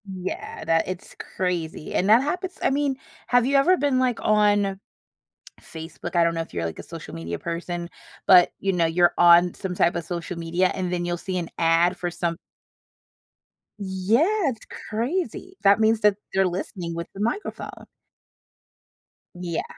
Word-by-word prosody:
Yeah, 185 -3 -6
that 165 0 +2
it's 185 -1 -7 0.2
crazy, 175 -4 -3
and 190 - +1
that 230 +4 +6
happens 360 +5 -3
I - - +4
mean, 280 -1 0 0.3
have 245 -1 +3
you 275 +2 +1
ever 345 +7 +5
been, 280 -4 +1
like, 250 -2 +1
on 205 -2 +2 0.8
Facebook? 160 +2 -8
I 170 - +5
don't 170 0 +1
know 165 - -2
if 165 - -6
you're, 85 -1 -3
like, 80 -1 -4
a - - -7
social - - -9
media 85 +1 -5
person, 170 0 -4 0.4
but, 180 -2 +7
you 195 0 0
know, 170 -2 +2
you're 175 +2 +3
on 175 0 +6
some 190 -2 -4
type 170 -1 +2
of 170 - -3
social 175 +1 -5
media, 170 +3 +1
and 180 -2 -3
then 175 -1 -1
you'll 175 0 -1
see 185 +1 -4
an 170 -2 -4
ad 170 +2 +3
for 175 - -3
some 170 -1 -2 1.4
Yeah, 195 +6 +1 0.3
it's 230 -4 -7 0.2
crazy, 265 - -3
that 200 +1 +5
means 220 0 +3
that 210 -1 +4 0.2
they're 190 0 +3
listening 175 -1 -4
with 170 0 -5
the 195 - -7
microphone. 235 - -4 1.5
Yeah. 175 -2 -3
185 Hz, 170 wpm, -24 LUFS, 170-215 Hz, 1.5 s, but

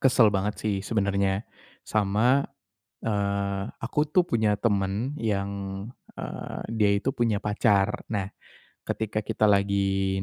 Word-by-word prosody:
kesel 120 -5 +5
banget 105 +2 0
sih, 105 -2 +1
sebenernya, 100 -1 0 0.4
sama, 110 +6 +3 0.6
eee, 100 -2 0 0.2
aku 150 +5 0
tuh 175 +4 +3
punya 110 -8 +1
temen 100 +3 0
yang, 100 -3 0 0.7
eee, - - -6
dia 105 -3 +3
itu 125 +7 -1
punya 120 -5 +1
pacar. 105 -1 +2
Nah, 100 -2 -2 0.5
ketika 110 -1 -2
kita 110 -1 +3
lagi 95 -1 +1
105 Hz, 115 wpm, -26 LUFS, 100-110 Hz, 0.7 s, kesel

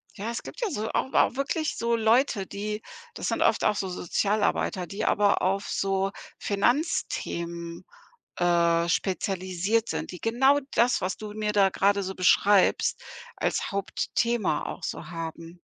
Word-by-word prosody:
Ja, 220 +3 -4
es 235 - -4
gibt - - -9
ja 455 - 0
so 220 -3 -3
auch 265 - -1
auch - - +3
wirklich 285 +3 -1
so 235 0 +1
Leute, 225 -2 +2
die 210 +1 -4 0.3
das - - -4
sind - - -1
oft - - +2
auch 210 - +3
so 190 -2 -2
Sozialarbeiter, 185 0 0
die 195 - -4
aber 205 -1 +3
auf 195 +2 0
so 195 0 0 0.3
Finanzthemen, 170 - -1 0.5
äh, 170 -1 +2
spezialisiert 190 +4 0
sind, - - -4
die 180 - -9
genau 265 +5 +3
das, 240 +1 +3
was 185 +1 -2
du 210 -1 -7
mir 210 0 -2
da 200 -2 +5
gerade 200 +1 +2
so 190 0 -4
beschreibst, 195 +2 +3 0.3
als - - -1
Hauptthema 200 -1 -1
auch - - -7
so - - -5
haben. 165 +1 -7
200 Hz, 155 wpm, -27 LUFS, 180-225 Hz, 0.5 s, da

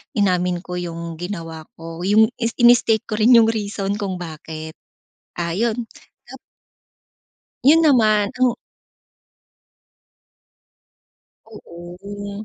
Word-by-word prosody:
inamin 180 -4 0
ko 180 -1 -5
yung 170 -1 -6
ginawa 165 -4 -7
ko, 165 0 -9
yung 220 +3 +4
is 230 -1 -2
ini-state 240 -2 +4
ko 215 0 -5
rin 235 +3 +6
yung 230 - +7
reason 205 -2 -3
kung 195 -2 -3
bakit. 160 -2 -8 0.7
Ah, 170 0 -2
yon 230 +1 -1 0.4
tap - - -11 1.3
Yun 305 +5 +6
naman 215 -9 +3
ang 245 -1 +3 2.9
Oo. 200 +1 -9
200 Hz, 100 wpm, -20 LUFS, 170-225 Hz, 2.9 s, yung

